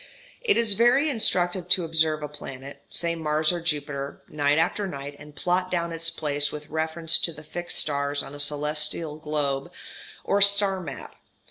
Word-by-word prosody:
It 470 Hz, -3 st, +2 dB
is 230 Hz, -3 st, +3 dB
very 245 Hz, +8 st, +4 dB
instructive 180 Hz, -6 st, +1 dB
to 185 Hz, -1 st, +4 dB
observe 160 Hz, -1 st, +1 dB
a -, -, -2 dB
planet 140 Hz, -2 st, -9 dB
(say 170 Hz, -1 st, -1 dB
Mars 155 Hz, -1 st, +1 dB
or 175 Hz, -1 st, -3 dB
Jupiter) 145 Hz, -3 st, -3 dB
night 145 Hz, 0 st, +1 dB
after 195 Hz, +5 st, +1 dB
night 140 Hz, -3 st, -6 dB
and 150 Hz, 0 st, -13 dB
plot 180 Hz, +2 st, 0 dB
down 170 Hz, -2 st, -1 dB
its 165 Hz, 0 st, -1 dB
place 145 Hz, -1 st, 0 dB
with 150 Hz, 0 st, -8 dB
reference 160 Hz, +1 st, +3 dB
to 170 Hz, -, 0 dB
the 155 Hz, -1 st, -11 dB
fixed 175 Hz, +3 st, -6 dB
stars 145 Hz, -1 st, 0 dB
on 140 Hz, -, -10 dB
a 145 Hz, -, -8 dB
celestial 150 Hz, +1 st, -1 dB
globe 145 Hz, -3 st, -2 dB, 0.5 s
or 200 Hz, -, +1 dB
star 200 Hz, -1 st, +4 dB
map. 140 Hz, -6 st, -8 dB
160 Hz, 170 wpm, -26 LUFS, 145-175 Hz, 0.5 s, very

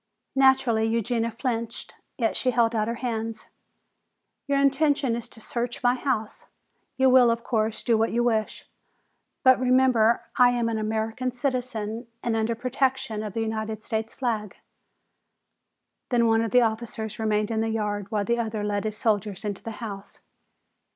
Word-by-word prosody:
Naturally 265 Hz, -4 st, +4 dB
Eugenia 230 Hz, +1 st, 0 dB
flinched, 230 Hz, -1 st, -4 dB, 0.2 s
yet 230 Hz, -4 st, 0 dB
she 255 Hz, -, 0 dB
held 235 Hz, -1 st, +2 dB
out 215 Hz, -1 st, 0 dB
her 235 Hz, -, -2 dB
hands. 225 Hz, -1 st, -3 dB, 1.0 s
"Your 280 Hz, 0 st, +2 dB
intention 275 Hz, -2 st, +2 dB
is 235 Hz, -, -6 dB
to -, -, -9 dB
search 240 Hz, +2 st, -4 dB
my 245 Hz, 0 st, +4 dB
house. 245 Hz, -4 st, -3 dB, 0.5 s
You 265 Hz, 0 st, +4 dB
will, 255 Hz, -2 st, +6 dB
of 230 Hz, 0 st, 0 dB
course, 220 Hz, -2 st, -1 dB
do 235 Hz, -, +3 dB
what 225 Hz, -, +1 dB
you 240 Hz, +1 st, +1 dB
wish. 220 Hz, -3 st, -1 dB, 0.8 s
But 260 Hz, -1 st, +6 dB
remember 250 Hz, -3 st, +3 dB, 0.2 s
that -, -, +8 dB
I 245 Hz, -, +7 dB
am 235 Hz, -1 st, 0 dB
an 225 Hz, -1 st, -1 dB
American 220 Hz, +3 st, -2 dB
citizen 240 Hz, -3 st, -3 dB, 0.2 s
and 235 Hz, -1 st, 0 dB
under 225 Hz, +1 st, 0 dB
the -, -, -25 dB
protection 255 Hz, -3 st, -1 dB
of 210 Hz, -2 st, -5 dB
the 225 Hz, -, -2 dB
United 220 Hz, -1 st, -3 dB
States 220 Hz, 0 st, -3 dB
flag." 220 Hz, -6 st, -3 dB, 1.5 s
Then 240 Hz, -2 st, +3 dB
one 225 Hz, 0 st, +3 dB
of 230 Hz, -, -1 dB
the 250 Hz, +4 st, +5 dB
officers 220 Hz, -1 st, -3 dB
remained 215 Hz, -1 st, 0 dB
in 220 Hz, -1 st, 0 dB
the 225 Hz, -, 0 dB
yard 205 Hz, -2 st, -2 dB
while 210 Hz, -2 st, -1 dB
the 235 Hz, +3 st, +1 dB
other 220 Hz, -2 st, -2 dB
led 205 Hz, 0 st, -1 dB
his 215 Hz, 0 st, -3 dB
soldiers 210 Hz, -2 st, -1 dB
into 205 Hz, -2 st, -3 dB
the -, -, -6 dB, 0.2 s
house. 200 Hz, -2 st, -8 dB
230 Hz, 170 wpm, -25 LUFS, 220-245 Hz, 1.5 s, that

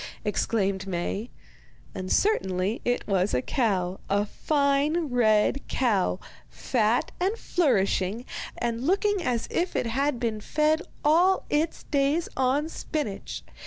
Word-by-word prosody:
exclaimed 200 Hz, -2 st, 0 dB
Maie. 195 Hz, +5 st, -3 dB, 0.6 s
And 185 Hz, -1 st, -5 dB
certainly 195 Hz, -, +1 dB
it 245 Hz, 0 st, -1 dB
was 190 Hz, -4 st, +1 dB
a 125 Hz, -, +2 dB
cow, 190 Hz, -7 st, 0 dB
a 205 Hz, +1 st, +2 dB
fine 290 Hz, +5 st, +1 dB
red 225 Hz, +2 st, +3 dB
cow, 205 Hz, -7 st, +1 dB, 0.3 s
fat 230 Hz, -1 st, 0 dB
and 390 Hz, +5 st, 0 dB
flourishing, 220 Hz, -, +1 dB, 0.3 s
and 235 Hz, -1 st, -2 dB
looking 400 Hz, +1 st, +2 dB
as 245 Hz, -8 st, -1 dB
if 355 Hz, +1 st, -1 dB
it -, -, 0 dB
had 265 Hz, +3 st, 0 dB
been 225 Hz, -3 st, -2 dB
fed 305 Hz, +6 st, +1 dB, 0.2 s
all 350 Hz, +5 st, +4 dB
its 310 Hz, +2 st, 0 dB
days 285 Hz, +4 st, +1 dB
on 265 Hz, +4 st, +1 dB
spinach. 300 Hz, -9 st, -4 dB
245 Hz, 125 wpm, -26 LUFS, 205-305 Hz, 0.6 s, all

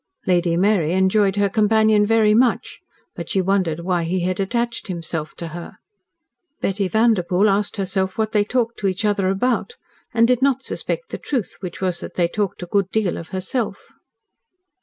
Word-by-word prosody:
Lady 175 Hz, -2 st, +2 dB
Mary 180 Hz, -4 st, +2 dB
enjoyed 190 Hz, +1 st, +2 dB
her 205 Hz, 0 st, +2 dB
companion 215 Hz, 0 st, +3 dB
very 220 Hz, -1 st, +4 dB
much, 240 Hz, +2 st, +1 dB, 0.4 s
but -, -, -7 dB
she 195 Hz, -, +1 dB
wondered 185 Hz, -4 st, 0 dB
why 175 Hz, -1 st, 0 dB
he 175 Hz, +2 st, -1 dB
had 185 Hz, +1 st, -1 dB
attached 235 Hz, +4 st, -2 dB
himself 165 Hz, -4 st, -4 dB
to 170 Hz, -, -6 dB
her. 170 Hz, +2 st, -9 dB, 0.8 s
Betty 195 Hz, 0 st, -1 dB
Vanderpoel 205 Hz, -2 st, +2 dB
asked 205 Hz, +2 st, 0 dB
herself 190 Hz, -1 st, -1 dB
what 220 Hz, -1 st, 0 dB
they 210 Hz, -2 st, +3 dB
talked 235 Hz, +1 st, -1 dB
to 200 Hz, -, 0 dB
each 190 Hz, +3 st, -1 dB
other 200 Hz, -2 st, +1 dB
about, 250 Hz, -, 0 dB, 0.4 s
and 230 Hz, 0 st, +4 dB
did 250 Hz, 0 st, +2 dB
not 270 Hz, -1 st, +2 dB
suspect 485 Hz, -, -4 dB
the -, -, -4 dB
truth, 250 Hz, -8 st, -3 dB
which 180 Hz, -2 st, -7 dB
was 180 Hz, -2 st, -1 dB
that -, -, -8 dB
they 175 Hz, -2 st, +2 dB
talked 200 Hz, 0 st, -3 dB
a -, -, -4 dB
good 195 Hz, +1 st, 0 dB
deal 210 Hz, -4 st, 0 dB
of 165 Hz, -, -8 dB
herself. 195 Hz, +3 st, -3 dB
195 Hz, 180 wpm, -21 LUFS, 180-220 Hz, 0.8 s, very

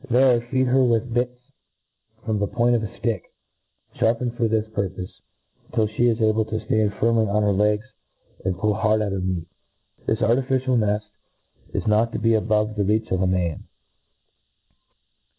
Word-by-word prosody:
There 125 Hz, 0 st, +4 dB
feed 130 Hz, 0 st, +2 dB
her 130 Hz, +1 st, +3 dB
with 120 Hz, -1 st, +1 dB
bits 125 Hz, +1 st, 0 dB, 0.9 s
from 110 Hz, -2 st, -1 dB
the 100 Hz, -, 0 dB
point 120 Hz, +2 st, +2 dB
of 115 Hz, -, +1 dB
a 110 Hz, -, -3 dB
flick, 110 Hz, -3 st, -3 dB, 0.8 s
Sharpened 120 Hz, +1 st, +1 dB
for 120 Hz, -2 st, +1 dB
this 110 Hz, -1 st, 0 dB
purpofe, 95 Hz, -3 st, -4 dB, 0.6 s
till 110 Hz, -, +3 dB
flie 110 Hz, +3 st, 0 dB
is 115 Hz, -1 st, +1 dB
able 110 Hz, 0 st, +2 dB
to 110 Hz, -, -5 dB
ftand 110 Hz, -2 st, 0 dB
firmly 115 Hz, -1 st, +3 dB
on 105 Hz, +1 st, +1 dB
her 105 Hz, -, +3 dB
legs, 105 Hz, +2 st, +1 dB, 0.6 s
and 95 Hz, -1 st, -1 dB
pull 105 Hz, +2 st, +1 dB
hard 110 Hz, 0 st, +1 dB
at 100 Hz, -, -2 dB
her 95 Hz, -, -2 dB
meat. 90 Hz, -2 st, -2 dB, 0.6 s
This 110 Hz, +1 st, 0 dB
artificial 130 Hz, +2 st, +1 dB
neil 105 Hz, -2 st, +1 dB, 0.7 s
is -, -, -1 dB
not 110 Hz, +2 st, +2 dB
to -, -, -1 dB
be 115 Hz, +2 st, +2 dB
above 105 Hz, -1 st, +1 dB
the 100 Hz, -, +2 dB
reach 110 Hz, +3 st, 0 dB
of 95 Hz, -1 st, +1 dB
a 95 Hz, -, +2 dB
man. 90 Hz, -3 st, -1 dB
110 Hz, 170 wpm, -23 LUFS, 105-120 Hz, 0.9 s, There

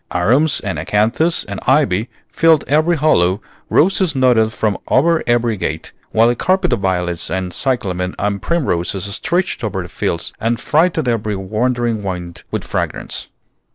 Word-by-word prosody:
Arums 125 Hz, -, +2 dB
and 95 Hz, -7 st, -3 dB
acanthus 115 Hz, -, +1 dB
and 100 Hz, -1 st, -6 dB
ivy 120 Hz, -6 st, +2 dB, 0.2 s
filled 160 Hz, -3 st, +3 dB
every 155 Hz, +4 st, +2 dB
hollow, 95 Hz, -, +3 dB, 0.3 s
roses 185 Hz, -2 st, +2 dB
nodded 120 Hz, -4 st, +3 dB
from 105 Hz, -3 st, -1 dB
over 165 Hz, +5 st, +3 dB
every 120 Hz, -1 st, +2 dB
gate, -, -, -4 dB, 0.2 s
while 115 Hz, +1 st, +4 dB
a 120 Hz, -, +2 dB
carpet 185 Hz, -1 st, +1 dB
of 120 Hz, -, 0 dB
violets 90 Hz, -3 st, -1 dB
and 90 Hz, 0 st, -3 dB
cyclamen 95 Hz, -8 st, -2 dB
and 100 Hz, 0 st, -1 dB
primroses 95 Hz, -, -1 dB
stretched 170 Hz, -, -1 dB
over 95 Hz, -4 st, -2 dB
the 90 Hz, -, -10 dB
fields 85 Hz, -, -2 dB
and 115 Hz, +1 st, 0 dB
freighted 160 Hz, -1 st, +1 dB
every 110 Hz, -3 st, 0 dB
wandering 115 Hz, +3 st, -1 dB
wind 90 Hz, -2 st, -5 dB
with -, -, -3 dB
fragrance. -, -, -4 dB
110 Hz, 150 wpm, -18 LUFS, 95-145 Hz, 0.3 s, while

